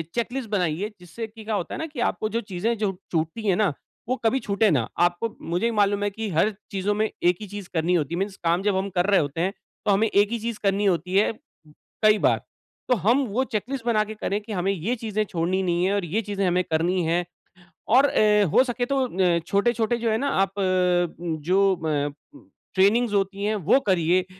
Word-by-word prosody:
Checklist 240 0 -2
बनाइए 185 0 -1
जिससे 180 +6 -7
की 220 0 -13
क्या 215 0 -2
होता 180 - -3
है - - -6
ना 320 - -2
कि 290 -5 -9
आपको 215 - -4
जो 230 +2 -1
चीज़ें 210 +3 -2
जो 205 -2 -1 0.2
छूटती 165 +6 -2
है 190 - +4
ना 200 -6 +1 0.4
वो 255 - +2
कभी 255 +4 +3
छूटे 210 -1 +1
ना। 125 -7 +1
आपको 175 +5 +2
मुझे 175 +6 -1
भी 235 - +2
मालूम 205 0 +2
है 205 - +1
कि 220 +2 -5
हर 170 +6 +3 0.2
चीज़ों 195 +1 0
में 215 +1 +1
एक 175 0 +4
ही 210 - -6
चीज़ 205 -1 -8
करनी 165 +2 +1
होती 155 -2 -1
है - - -2
मीन्स 195 0 -2
काम 170 +2 +2
जब 205 -1 +1
हम 195 +1 -1
कर 175 0 +2
रहे 200 -1 +4
होते 145 +2 -2
हैं 185 +2 +1 0.3
तो 205 - +3
हमें 205 +3 +3
एक 205 -1 +3
ही 235 - -1
चीज़ 230 0 -4
करनी 200 +1 +1
होती 180 0 0
है, 200 - +4 0.7
कई 215 0 +6
बार। - - +2 0.5
तो 250 - +5
हम 235 - +2
वो 230 +5 0
चेक 215 -6 -2
लिस्ट 270 -4 -4
बना 220 -3 +3
के 215 - -7
करें 205 -1 -2
कि 215 +2 -10
हमें 190 0 0
ये 195 +8 -2
चीज़ें 215 -2 -2
छोड़नी 180 +1 -1
नहीं 175 0 +1
है 195 - +1
और 200 -3 -1
ये 195 +7 -1
चीज़ें 200 -2 -2
हमें 180 +1 +2
करनी 175 +2 0
है 170 +2 +1 0.6
और 260 +5 +5
अ, 210 -6 +3
हो - - +6
सके 245 -1 -3
न 245 - -1
तो 190 -11 +1
अ, - - 0
छोटे-छोटे 230 +3 +1
जो 230 -1 0
है 220 - +2
ना, 280 +4 -1
आप 195 -3 0
अ, 180 -2 +1
जो 180 +4 +1
अ, 150 -4 -1 0.6
ट्रेनिंगस 210 +4 +3
होती 200 0 0
हैं 215 +1 +1
वो 205 - +3
करिए 180 0 +2
200 Hz, 230 wpm, -24 LUFS, 180-220 Hz, 0.7 s, कई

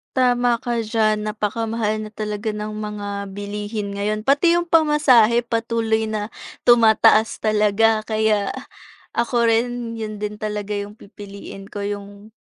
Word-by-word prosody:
Tama 245 -2 +2
ka 240 -1 -2
diyan. 215 -1 0
Napakamahal 215 +1 -2
na 215 - -11
talaga 210 +1 -3
ng 210 0 -4
mga 205 -2 -5
bilihin 205 0 -5
ngayon, 210 +1 -1
pati 285 +8 +3
'yong 345 0 0
pamasahe, 295 -8 +4
patuloy 230 -1 -1
na 215 -1 -3 0.4
tumataas 220 -1 +5
talaga. 215 +1 +2
Kaya, 215 -2 +1 0.6
ako 235 0 +2
rin 235 0 -1
'yon 215 -2 -6
din 210 0 -4
talaga 210 -1 -4
'yong 205 +1 -5
pipiliin 200 -2 -11
ko, 205 0 -7
'yong 205 +1 -6
215 Hz, 130 wpm, -21 LUFS, 210-230 Hz, 0.6 s, tumataas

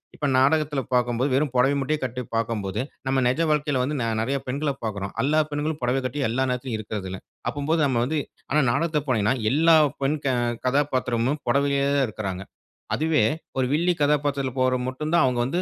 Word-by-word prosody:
இப்ப - - -3
நாடகத்தில 145 +1 +2
பார்க்கும்போது 120 +2 +1
வெறும் 145 0 +1
புடவைய 135 +3 +4
மட்டுமே 150 +3 0
கட்டி 125 0 -3
பார்க்கும்போது, 110 -4 -1 0.3
நம்ம 135 0 +2
நெஜ 125 +5 0
வாழ்க்கையில 145 -3 +1
வந்து 145 +3 -2
நெ - - 0 0.2
நெறைய 135 +5 0
பெண்களப் 140 +1 -2
பார்க்குறோம். 100 -2 -4
எல்லா 150 +5 +2
பெண்களும் 150 +1 -2
புடவ 125 +2 +1
கட்டி 130 +3 -3
எல்லா 130 +4 0
நேரத்திலும் 125 -2 -2
இருக்கிறதில்ல. 95 -3 -5 0.3
அப்பம்போது 155 +3 0
நம்ம 120 -3 +1
வந்து 155 +4 -1 0.3
ஆனா 150 +2 +4
நாடகத்த 155 +3 0
போனீங்கன்னா 110 +1 +2 0.2
எல்லா 165 +4 +5 0.3
பெண் 145 +3 +1
க - - +2 0.4
கதாப்பாத்திரமும் 130 0 0
புடவையிலே 140 +1 +2
இருக்கறாங்க. 100 -4 -5 0.5
அதுவே 155 -5 +2 0.3
ஒரு 130 - +2
வில்லி 175 +4 +2
கதாபாத்திரத்தில 145 -2 +1
போடுறது 130 -1 +2
மட்டும் 150 +5 -4
தான் 170 - +5
அவங்க 125 -2 0
வந்து 170 +8 -1
135 Hz, 170 wpm, -24 LUFS, 125-150 Hz, 0.5 s, எல்லா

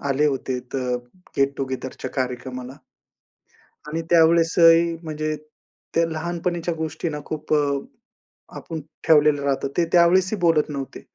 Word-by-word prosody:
आले 140 +2 +2
होते, 135 -2 -1
तर 135 -1 -1
अ, - - +1 0.4
गेट 140 0 +2
टु 135 - -1
गेदरच्या 130 0 -5
कार्यक्रमाला 125 0 -4 1.1
आणि 160 +2 -3
त्यावेळेस 165 0 +5
ही, 165 0 +6
म्हणजे 155 -1 -3 0.6
त्या 165 - +4
लहानपणीच्या 170 +1 -2
गोष्टींना 160 -1 -3
खूप 155 0 -4
अ, 140 -2 +1 0.8
आपण 160 -2 -6 0.3
ठेवलेलं 150 -2 +5
राहतं, 140 -1 0
ते 170 - +3
त्यावेळेस 180 +2 +5
ही - - -1
बोलत 165 -3 +3
नव्हते. 140 -2 -6
155 Hz, 135 wpm, -23 LUFS, 140-165 Hz, 1.1 s, ही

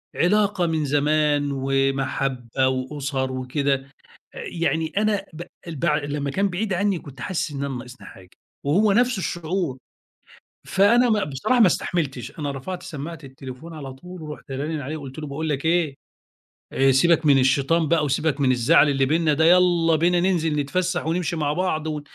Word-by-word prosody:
علاقة 200 0 +2
من 160 -2 0
زمان، 145 0 +1
ومَحَبَّة 135 -2 0
وأُسَر 130 0 -2
وكده، 135 +2 -1 0.6
آآ - - -9
يعني 160 -2 -1
أنا 210 -1 +1
ب 160 +2 -7 0.3
ال 160 - -6
بع 150 +1 +1
لمّا 145 -1 -3
كان 200 +6 +1
بعيد 195 +3 -2
عني 195 0 +1
كنت 135 -5 -12
حاسِسّ 170 +3 -2
إن 140 -1 -4
أنا 135 -2 -3
ناقصني 125 +1 -10
حاجة، 95 -2 -14 0.3
وهو 195 +9 +3
نفس 245 0 +2
الشُّعُور، 175 -5 -2 0.9
فأنا 230 +5 +4
م 210 -2 +2
بصراحة 150 - 0
ما 220 - +8
استحملتش، 150 - -2
أنا 145 -2 -2
رفعت 155 +7 -6
سمَّاعة 160 +2 -7
التليفون 135 +4 -10
على 135 -3 -7
طُول، 180 +5 -11
ورُحت 150 -2 -9
رانن 145 +4 -3
عليه 145 +3 -5
وقُلت 140 -2 -9
له: 150 - -5
"باقول 155 +3 -4
لك 140 -1 -2
إيه، 160 -3 +1 0.8
آآ 135 0 +4
سيبك 165 +5 +3
من 140 -2 +6
الشيطان 140 +5 +2
بقى 160 -1 +2
وسيبك 145 +1 0
من 130 -2 +4
الزعل 125 +4 +4
اللي 135 -1 +2
بيننا 155 +2 +2
ده، 160 +2 +2
يالّا 175 -2 +4
بينا 175 +3 +2
ننزل 170 -4 +1
نتفسَّح 175 +4 -1
ونمشي 170 0 -1
مع 150 -2 0
بعض، 160 -2 -1
و 150 -1 -3
155 Hz, 170 wpm, -23 LUFS, 135-175 Hz, 0.9 s, ما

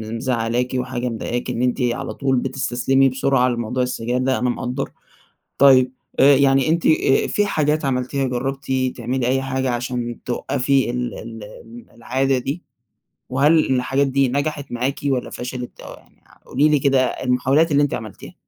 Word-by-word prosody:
مزعلاكِ 120 0 -1
وحاجة 125 -1 -2
مضايقاكِ 120 +2 -4
إن 120 - -2
أنتِ 125 +1 0
على 120 -1 -1
طول 135 -1 0
بتستسلمي 135 +1 +1
بسرعة 130 0 +1
لموضوع 120 +1 -1
السجاير 125 0 -2
ده، 130 +1 0
أنا 125 - 0
مقدَّر، 125 +2 -3 0.7
طيب 130 -2 +6 0.3
آآ، 140 0 +7
يعني 135 0 +3
أنتِ 165 +1 +1 0.4
في 205 0 +1
حاجات 155 -4 0
عملتيها 135 +1 -1
جربتِ 135 +2 -3 0.3
تعملي 125 +1 -2
أي 135 +1 +1
حاجة 130 -1 -1
عشان 120 -1 -3
توقفي 130 +1 0
ال 125 0 -3
ال 115 -1 -9 0.5
العادة 130 +3 0
دي؟ 140 +7 -4 0.7
وهل 140 +2 +3
الحاجات 135 +2 +1
دي 135 -1 +2
نجحت 145 +1 -2
معاكِ 125 +3 -1
والَّا 130 -3 0
فشلت، 125 0 -7
أو - - -9
يعني - - -20 0.2
قولي 145 +4 +2
لي 150 -1 +3
كده 135 -1 +3
المحاولات 130 +6 +1
اللي 145 0 +4
أنتِ 145 - -1
عملتيها؟ 110 -3 -7
130 Hz, 155 wpm, -21 LUFS, 125-135 Hz, 0.7 s, آآ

